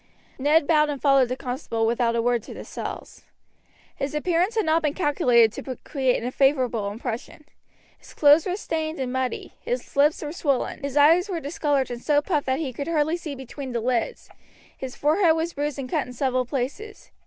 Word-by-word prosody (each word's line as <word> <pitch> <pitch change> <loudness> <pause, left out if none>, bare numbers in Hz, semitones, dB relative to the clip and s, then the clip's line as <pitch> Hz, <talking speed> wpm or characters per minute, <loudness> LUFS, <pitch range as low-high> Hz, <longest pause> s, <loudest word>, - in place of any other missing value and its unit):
Ned 295 +3 +3
bowed 300 -1 +3
and 285 -2 -3
followed 275 -3 +4
the 255 - -1
constable 245 -3 -2
without 235 0 +1
a 230 - +1
word 240 -1 +1
to - - -10
the - - -8
cells. - - -7 0.7
His 280 +2 -4
appearance 350 +7 +1
had 440 - +1
not 320 +1 +3
been 300 -2 -1
calculated 245 - +3
to 260 -2 -6
create 265 -5 0
a 250 - -2
favorable 255 -7 +1
impression. 235 +6 -6 0.5
His - - -16
clothes 295 +3 +5
were 365 - -1
stained 320 -5 -3
and 255 -1 -2
muddy; 260 -1 -3
his - - -4
lips 295 +3 +3
were 295 - -4
swollen, 285 -6 -1
his 280 0 -3
eyes 330 +7 +5
were 350 -3 -2
discolored 285 -3 -1
and 240 0 -6
so 295 +1 +3
puffed 295 -2 -1
that 260 0 +1
he 280 -4 -3
could 280 +4 -5
scarcely 315 0 +1
see 320 -5 -6
between 265 0 -7
the 235 - 0
lids, 240 0 -2 0.5
his 260 -1 -7
forehead 320 +3 +3
was 330 +1 -2
bruised 290 0 -3
and 270 -2 -4
cut - - -1
in 250 - -9
several 255 0 0
places. 290 - -5
280 Hz, 200 wpm, -24 LUFS, 250-315 Hz, 0.7 s, clothes